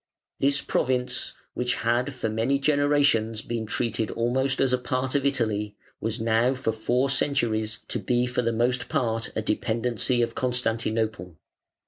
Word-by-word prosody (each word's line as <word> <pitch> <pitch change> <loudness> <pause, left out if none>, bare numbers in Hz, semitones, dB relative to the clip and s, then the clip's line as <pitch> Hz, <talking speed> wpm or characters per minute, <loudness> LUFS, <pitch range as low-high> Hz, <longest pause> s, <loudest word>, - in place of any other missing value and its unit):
This 140 +1 +2
province, 125 -1 -1 0.2
which 125 0 0
had 120 +4 +1
for 125 - -2
many 115 +5 +1
generations 140 -6 +2
been 115 -2 -3
treated 115 -1 -1
almost 130 +3 0
as 130 -2 +2
a 125 - +2
part 130 +1 -2
of 140 -1 +2
Italy, 105 -6 -1 0.2
was 110 +2 -2
now 115 +3 +2
for 130 -3 -1
four 120 +4 +1
centuries 120 -6 0
to - - -1
be 125 -1 +1
for 125 0 -1
the 115 -1 0
most 125 +2 0
part 115 -2 -1
a 110 - -1
dependency 120 +3 0
of 115 - -2
Constantinople. 115 -6 -1
120 Hz, 150 wpm, -26 LUFS, 110-130 Hz, 0.2 s, This